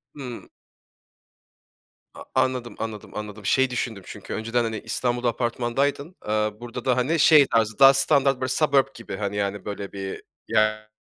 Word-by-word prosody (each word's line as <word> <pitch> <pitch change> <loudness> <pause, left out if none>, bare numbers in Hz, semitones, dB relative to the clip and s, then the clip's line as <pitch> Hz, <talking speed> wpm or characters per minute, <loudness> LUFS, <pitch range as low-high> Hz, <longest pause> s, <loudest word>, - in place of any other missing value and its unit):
Hıı. 125 -4 -7 1.7
A - - -10
anladım, 125 -2 0
anladım, 110 -2 -6
anladım. 105 -1 -7
Şey 130 0 +3
düşündüm 115 -5 -4
çünkü, - - -8
önceden, 115 +2 -1
hani, 110 -1 -3
İstanbul'da 120 +2 -1
apartmandaydın. 130 +7 -1
Iıı, 105 0 -1
burada 120 0 -7
da, 130 -2 +2
hani, 150 +7 +1
şey 150 -2 +7
tarzı, 110 -1 0
daha 135 0 +9
standart 135 -1 +2
böyle 130 - 0
suburb 140 -1 +3
gibi, 115 -4 -8
hani, 100 -1 -3
böyle 100 -1 -5
bir 95 -1 -6 0.3
yer 110 0 +1
120 Hz, 145 wpm, -24 LUFS, 105-130 Hz, 1.7 s, daha